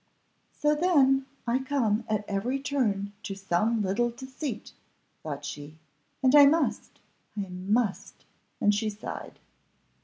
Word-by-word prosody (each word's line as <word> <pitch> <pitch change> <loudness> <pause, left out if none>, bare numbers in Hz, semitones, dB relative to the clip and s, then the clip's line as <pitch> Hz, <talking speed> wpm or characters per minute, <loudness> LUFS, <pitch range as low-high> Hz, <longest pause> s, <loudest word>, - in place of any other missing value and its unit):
"So 295 0 +1
then, 275 -5 +3 0.2
I 240 +2 +1
come 245 -5 0
at 210 -1 -1
every 230 +7 -1
turn 215 -8 -1
to 195 - -5
some 200 +4 0
little 210 +6 +1
deceit," 260 0 -6 0.5
thought 145 -2 -6
she, 145 +2 -8 0.5
"and 260 0 +5
I 285 -1 +10
must, 315 +2 0 0.4
I 195 -2 -3
must!" 200 +4 -1 0.3
and 205 - +4
she 215 +1 0
sighed. 210 0 -7
225 Hz, 125 wpm, -28 LUFS, 200-265 Hz, 0.5 s, I